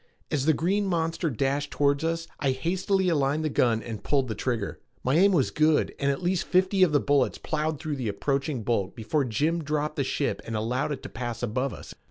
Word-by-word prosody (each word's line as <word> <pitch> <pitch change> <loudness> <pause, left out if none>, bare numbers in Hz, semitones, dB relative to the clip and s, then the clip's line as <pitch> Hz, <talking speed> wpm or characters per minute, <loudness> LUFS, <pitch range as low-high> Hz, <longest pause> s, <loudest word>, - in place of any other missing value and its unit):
As 145 -1 0
the 160 - +6
green 195 +6 +1
monster 165 -1 0
dashed 140 +3 -1
toward 140 +1 +1
us 165 0 -1
I 135 -2 +1
hastily 185 +6 0
aligned 150 -1 +1
the - - +1
gun 115 -4 +2
and 115 -3 -6
pulled 135 -4 +1
the - - -1
trigger. 110 -1 -2 0.2
My 130 - +1
aim 195 +4 +5
was 150 -9 +2
good 155 0 +2
and 140 - +1
at 140 +6 -1
least 180 0 0
fifty 190 +1 +2
of 185 -4 +6
the 145 - +4
bullets 140 -1 +2
plowed 155 -1 -2
through 155 -3 -3
the 125 -4 -3
approaching 135 +3 -1
bulk 100 -5 -1
before 135 +6 0
Jim 155 +9 0
dropped 150 0 -2
the 140 - +2
ship 140 +2 -1
and 115 - -5
allowed 120 +7 -1
it 140 - -4
to - - -6
pass 120 -2 -5
above 125 +4 -1
us. - - -9
145 Hz, 220 wpm, -27 LUFS, 130-160 Hz, 0.2 s, the